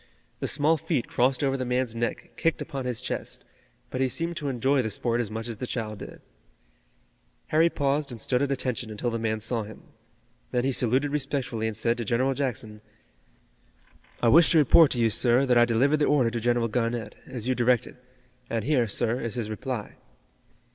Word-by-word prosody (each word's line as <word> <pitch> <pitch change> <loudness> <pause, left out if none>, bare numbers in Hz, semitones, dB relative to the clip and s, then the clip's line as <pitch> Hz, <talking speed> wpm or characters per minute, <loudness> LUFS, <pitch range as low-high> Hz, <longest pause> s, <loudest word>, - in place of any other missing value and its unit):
The - - -2
small 155 +3 +3
feet 145 -5 -2
crossed 130 +3 +1
over 135 -1 +1
the 130 - -2
man's 125 -1 -1
neck 115 0 -3
kicked 165 - 0
upon 135 -2 -5
his 125 -3 -2
chest, - - -4 0.5
but 130 - -2
he 130 - +2
seemed 170 +4 -2
to 145 -4 -3
enjoy 130 +2 +1
the 110 - -2
sport 120 +3 0
as 110 - -4
much 110 +1 -5
as 115 -2 -5
the 125 - -5
child 110 -4 -4
did. - - -10 1.3
Harry 160 +2 +4
paused 140 -1 0
and 120 -3 -6
stood 125 +3 0
at 140 -1 0
attention 125 -3 -2
until 110 +3 -3
the 115 - -2
man 110 -1 -1
saw 115 +1 -1
him. 110 +1 -10 0.7
Then 125 -1 0
he 135 - +1
saluted 130 +3 +1
respectfully 135 -6 -2
and 110 -2 -4
said 115 0 +1
to - - -1
General 125 +5 +1
Jackson: 115 -6 -3 1.4
"I 120 - +5
wish 165 +6 +7
to - - +5
report 155 +1 +6
to 125 - -3
you, 115 -1 +3
sir, 120 +4 +4
that 125 -2 +3
I 120 0 +6
delivered 125 +6 +2
the 150 - +2
order 130 -6 +3
to 120 - -2
General 120 0 +1
Garnett, 115 -1 -2
as 125 -2 -5
you 130 - +2
directed, 125 -1 +1 0.5
and 115 -2 -1
here, 130 -5 +2
sir, 115 +3 0
is 115 0 -3
his 110 -3 -3
reply." 120 0 -5
125 Hz, 200 wpm, -26 LUFS, 115-135 Hz, 1.4 s, wish